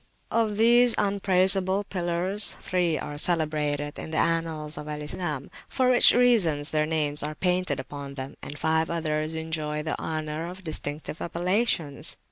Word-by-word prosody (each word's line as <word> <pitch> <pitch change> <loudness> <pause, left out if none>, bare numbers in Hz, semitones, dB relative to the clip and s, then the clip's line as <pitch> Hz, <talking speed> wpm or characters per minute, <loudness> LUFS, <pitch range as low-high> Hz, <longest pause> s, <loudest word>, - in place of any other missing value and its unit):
Of 220 -2 +1
these 240 +2 +5
unpraisable 195 -1 +3
pillars 185 +2 -1
three 175 -3 -1
are 145 0 -3
celebrated 150 -3 0
in - - -6
the 155 - -3
annals 165 -2 -1
of 150 - -7
Al 150 0 -4
Islam, 150 -2 -4 0.2
for 255 -1 +2
which 245 - +7
reason 220 -12 +3
their 155 0 +1
names 150 -2 0
are 150 +1 -4
painted 180 -4 0
upon 140 +1 -7
them, 130 0 -7
and 145 - -7
five 160 +1 +1
others 155 -1 -2
enjoy 155 -1 -3
the 155 - -3
honour 155 +1 -3
of 185 +2 -9
distinctive 155 -1 -4
appellations. 175 -3 0
160 Hz, 150 wpm, -26 LUFS, 150-185 Hz, 0.2 s, which